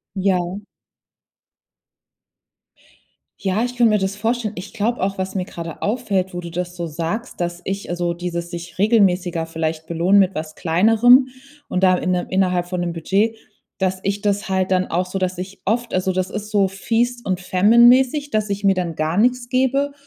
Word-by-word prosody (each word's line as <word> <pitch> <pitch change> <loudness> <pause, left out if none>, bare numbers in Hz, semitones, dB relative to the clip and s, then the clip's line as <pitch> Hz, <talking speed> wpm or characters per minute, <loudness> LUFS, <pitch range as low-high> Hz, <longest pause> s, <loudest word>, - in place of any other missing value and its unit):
Ja. 190 0 0 2.8
Ja, 200 +3 0
ich 245 0 -3
könnt 235 -2 +4
mir 215 - +3
das 190 0 -2
vorstellen. 225 0 -1
Ich 185 +3 -8
glaub 230 +2 -1
auch, 195 +1 -1
was 190 +1 -4
mir 185 -2 -1
grade 170 -3 -8
auffällt, 200 -5 -1
wo 175 - -4
du 170 -1 -8
das 180 +1 -4
so 170 -1 -4
sagst, 170 +9 -4
dass 175 0 -3
ich 195 +1 -4
also 175 0 -1
dieses 170 0 -5
sich 170 -1 -8
regelmäßiger 185 -5 +2
vielleicht 160 -1 -4
belohnen 170 +4 +3
mit 190 -1 +2
was 155 0 -5
Kleinerem 225 +9 +5 0.4
und 185 - -2
da 185 -1 +5
inne 180 0 -1
innerhalb 180 -2 +1
von 180 -1 -3
'nem 175 -1 -2
Budget, 200 +7 0 0.4
dass 190 -1 0
ich 200 +1 -1
das 205 -1 -1
halt 190 -1 0
dann 185 -1 +2
auch 180 +2 0
so 185 - -4
dass 185 -1 -2
ich 190 +2 -7
oft 235 +3 0
also 185 0 +1
das 185 0 -1
ist 210 +1 -6
so 200 -2 +3
Feast 235 +5 -1
und 185 -1 -1
Famine 205 +6 +4
mäßig, 265 +4 +3
dass 215 -5 0
ich 200 +1 -3
mir 195 -1 +4
dann 175 -2 -2
gar 155 +3 -1
nix 245 +2 +2
gebe 265 +2 +1
190 Hz, 185 wpm, -20 LUFS, 175-215 Hz, 2.8 s, Kleinerem